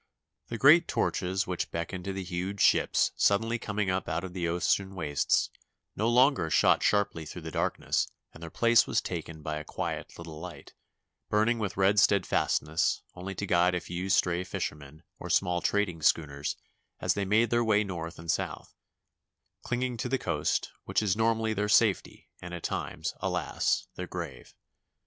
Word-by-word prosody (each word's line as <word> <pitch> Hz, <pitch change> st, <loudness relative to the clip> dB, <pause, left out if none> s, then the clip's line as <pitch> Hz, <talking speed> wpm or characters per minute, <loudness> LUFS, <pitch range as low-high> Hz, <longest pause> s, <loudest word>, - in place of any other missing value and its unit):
The 115 Hz, -, -4 dB
great 155 Hz, +8 st, +6 dB
torches 95 Hz, +1 st, 0 dB
which 90 Hz, -1 st, -3 dB
beckon 85 Hz, +2 st, -4 dB
to 95 Hz, +2 st, -4 dB
the 95 Hz, 0 st, -4 dB
huge 90 Hz, +2 st, -4 dB
ships -, -, +3 dB
suddenly 115 Hz, +4 st, +2 dB
coming 105 Hz, -3 st, -1 dB
up 95 Hz, +1 st, -2 dB
out 85 Hz, 0 st, -2 dB
of 95 Hz, -1 st, -7 dB
the 90 Hz, -2 st, -2 dB
ocean 95 Hz, +3 st, 0 dB
wastes 75 Hz, -5 st, +1 dB, 0.4 s
no 110 Hz, +3 st, +1 dB
longer 125 Hz, -, +4 dB
shot -, -, +4 dB
sharply 100 Hz, -6 st, +1 dB
through 80 Hz, +2 st, -9 dB
the 80 Hz, -, -6 dB
darkness -, -, 0 dB, 0.3 s
and 80 Hz, -, -14 dB
their 85 Hz, -, -7 dB
place 115 Hz, +5 st, +4 dB
was -, -, +2 dB
taken 80 Hz, -1 st, -6 dB
by 75 Hz, 0 st, -3 dB
a 75 Hz, -, -5 dB
quiet -, -, -5 dB
little 80 Hz, -2 st, -9 dB
light, 90 Hz, +1 st, -10 dB, 0.6 s
burning 110 Hz, +3 st, +2 dB
with 105 Hz, -4 st, -3 dB
red 100 Hz, +2 st, +4 dB
steadfastness 85 Hz, -5 st, +2 dB
only 95 Hz, +2 st, -7 dB
to 100 Hz, -, -3 dB
guide 90 Hz, -1 st, +3 dB
a -, -, 0 dB
few 90 Hz, +2 st, -5 dB
stray 90 Hz, -1 st, +2 dB
fishermen 75 Hz, -3 st, -6 dB, 0.2 s
or -, -, -7 dB
small 90 Hz, -1 st, +2 dB
trading 90 Hz, -4 st, 0 dB
schooners 75 Hz, -2 st, +1 dB, 0.4 s
as -, -, +1 dB
they 100 Hz, -, -2 dB
made 105 Hz, +4 st, +2 dB
their 120 Hz, 0 st, +3 dB
way 105 Hz, -2 st, +3 dB
north 85 Hz, -4 st, -6 dB
and 80 Hz, 0 st, -2 dB
south, -, -, -4 dB, 0.9 s
clinging 125 Hz, 0 st, -2 dB
to 125 Hz, -, -3 dB
the 135 Hz, -, +1 dB
coast, 80 Hz, -, -1 dB
which -, -, 0 dB
is 100 Hz, -3 st, +1 dB
normally 110 Hz, 0 st, +1 dB
tneir 105 Hz, 0 st, -1 dB
safety 105 Hz, -2 st, +2 dB
and 90 Hz, 0 st, -6 dB
at 85 Hz, -, -8 dB
times, -, -, -3 dB
alas, -, -, 0 dB
their -, -, -6 dB
grave! -, -, -7 dB
95 Hz, 170 wpm, -29 LUFS, 85-105 Hz, 0.9 s, great